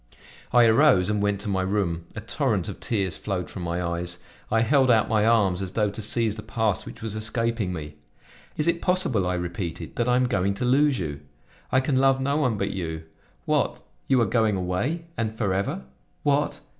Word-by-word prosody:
I 120 Hz, 0 st, +6 dB
arose, 110 Hz, -5 st, +4 dB
and 105 Hz, -1 st, 0 dB
went 100 Hz, -1 st, 0 dB
to 105 Hz, -, -3 dB
my 95 Hz, -2 st, 0 dB
room; 95 Hz, -4 st, -1 dB
a -, -, -5 dB
torrent -, -, -1 dB
of -, -, -6 dB
tears 95 Hz, -7 st, -1 dB
flowed 95 Hz, -4 st, -4 dB
from 95 Hz, -, -7 dB
my 85 Hz, +1 st, -2 dB
eyes. 85 Hz, +1 st, -3 dB, 0.3 s
I 115 Hz, +1 st, +2 dB
held 130 Hz, +2 st, +3 dB
out 110 Hz, -3 st, +4 dB
my 110 Hz, -1 st, +2 dB
arms 100 Hz, -6 st, +3 dB
as 95 Hz, -1 st, -5 dB
though 105 Hz, -2 st, +1 dB
to 110 Hz, -, -7 dB
seize 110 Hz, 0 st, +1 dB
the -, -, -5 dB
past 110 Hz, -3 st, -1 dB
which 115 Hz, -, -10 dB
was 110 Hz, -2 st, -3 dB
escaping 115 Hz, -2 st, -1 dB
me. 75 Hz, -3 st, -7 dB, 0.6 s
"Is 150 Hz, -, 0 dB
it 170 Hz, 0 st, +1 dB
possible," 175 Hz, -, +1 dB
I 90 Hz, -, 0 dB
repeated, 85 Hz, -1 st, -5 dB
"that 120 Hz, 0 st, +1 dB
I 125 Hz, -, +4 dB
am 125 Hz, 0 st, +3 dB
going 100 Hz, -5 st, 0 dB
to 110 Hz, -, -2 dB
lose 140 Hz, +2 st, +3 dB
you? 75 Hz, -7 st, -4 dB, 0.5 s
I 130 Hz, -, +4 dB
can 130 Hz, 0 st, 0 dB
love 135 Hz, 0 st, +4 dB
no 140 Hz, +2 st, 0 dB
one 125 Hz, -8 st, +1 dB
but 100 Hz, 0 st, -1 dB
you. 80 Hz, -4 st, -4 dB, 0.4 s
What! -, -, 0 dB, 0.2 s
you 130 Hz, -2 st, +4 dB
are -, -, +4 dB
going 110 Hz, -1 st, +2 dB
away? 95 Hz, -, -2 dB
And 110 Hz, -1 st, -2 dB
forever? 95 Hz, -, -1 dB, 0.4 s
What! 145 Hz, 0 st, +1 dB
105 Hz, 205 wpm, -25 LUFS, 90-125 Hz, 0.6 s, I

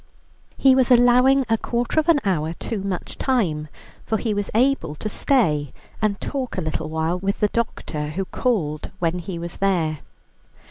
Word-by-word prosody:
He 270 Hz, -1 st, +6 dB
was 260 Hz, -1 st, +3 dB
allowing 250 Hz, +2 st, +5 dB
a 225 Hz, -1 st, +1 dB
quarter 240 Hz, +5 st, 0 dB
of 315 Hz, +2 st, 0 dB
an 320 Hz, -3 st, +6 dB
hour 165 Hz, -4 st, 0 dB
too 210 Hz, +4 st, -4 dB
much 195 Hz, -2 st, -5 dB
time, 175 Hz, -, 0 dB, 0.4 s
for 220 Hz, -, 0 dB
he 220 Hz, 0 st, -1 dB
was 205 Hz, -1 st, -2 dB
able 240 Hz, -, +2 dB
to 215 Hz, -, -5 dB
stay 160 Hz, -, +1 dB, 0.3 s
and 210 Hz, -2 st, 0 dB
talk 265 Hz, -6 st, -4 dB
a -, -, 0 dB
little 155 Hz, -1 st, -3 dB
while 160 Hz, +3 st, -1 dB
with 195 Hz, +2 st, -2 dB
the 210 Hz, -, +2 dB
doctor, 165 Hz, -10 st, -3 dB
who 185 Hz, +6 st, -3 dB
called 165 Hz, -11 st, -1 dB
when 175 Hz, 0 st, -1 dB
he 175 Hz, 0 st, -5 dB
was 170 Hz, 0 st, -6 dB
there. 170 Hz, -6 st, +1 dB
195 Hz, 175 wpm, -22 LUFS, 160-245 Hz, 0.4 s, He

